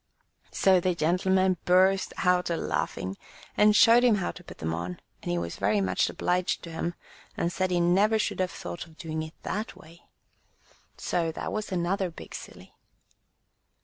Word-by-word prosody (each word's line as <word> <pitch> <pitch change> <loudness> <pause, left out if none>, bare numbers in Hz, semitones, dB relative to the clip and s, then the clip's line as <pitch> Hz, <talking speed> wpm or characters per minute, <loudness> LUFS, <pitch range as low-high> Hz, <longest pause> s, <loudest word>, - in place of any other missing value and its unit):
'* - - -44
So 190 -1 +4
the 180 0 0
gentleman 185 +3 +2
burst 190 +2 +3
out 180 -1 +2
a 170 - 0
laughing, 95 -9 -3 0.4
and 210 0 +5
showed 230 +2 +7
him 240 -3 +5
how 190 -3 -2
to 180 - -13
put - - -12
them 80 0 -3
on; 85 +2 -4 0.2
and - - -3
he 85 - 0
was 85 0 -4
very 100 +1 +2
much 95 -1 +1
obliged 180 0 -1
to 170 - -8
him, 170 +1 -3 0.4
and 170 +1 -1
said 185 0 0
he 180 -1 +1
never 195 +6 +3
should 215 - -1
have 185 -1 +1
thought 170 -1 -7
of 160 -1 -19
doing 160 -3 -4
it 155 0 -8
that 210 +3 -4
way. 165 +2 -17 0.9
So 165 -2 -1
that - - -5
was 215 -1 -3
another 185 +1 0
big 165 - -11
silly. - - -10
180 Hz, 180 wpm, -27 LUFS, 160-190 Hz, 0.9 s, showed